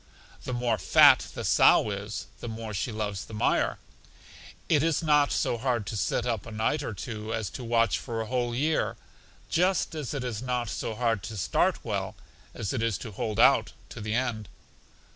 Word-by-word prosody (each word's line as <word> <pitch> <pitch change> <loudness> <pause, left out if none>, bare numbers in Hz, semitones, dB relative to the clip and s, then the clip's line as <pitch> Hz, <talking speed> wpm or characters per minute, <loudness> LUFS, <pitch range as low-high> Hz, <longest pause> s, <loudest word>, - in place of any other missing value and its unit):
The 130 - -3
more 120 -3 0
fat - - +6
the - - -4
sow 105 - +5
is, 100 +1 -5
the - - -7
more 110 -1 -6
she 105 +5 -2
loves 105 -3 -3
the 110 - -9
mire. 60 -11 +1 0.9
It 150 -4 +3
is 165 +1 +1
not 150 -2 +4
so 120 - 0
hard 120 -4 0
to 110 - -5
sit 105 +4 0
up 115 -4 -2
a - - -8
night 110 +7 0
or 115 -7 -5
two, 110 +1 -6
as 110 -4 -3
to 130 - -7
watch 115 0 +2
for 115 -3 -5
a 110 - -2
whole 120 0 -1
year; 155 +5 0 0.5
just 180 0 +1
as 150 -3 -4
it 135 - -3
is 120 -3 -4
not 125 -2 -2
so 110 - -4
hard 115 -3 0
to 110 -2 -6
start 85 -4 +1
well - - -3 0.4
as 100 - -3
it 125 - -1
is 115 -4 0
to 115 - -8
hold 105 +2 -3
out - - +5 0.2
to - - -8
the 105 +1 -2
end. 115 -5 -2
115 Hz, 200 wpm, -28 LUFS, 105-125 Hz, 0.9 s, fat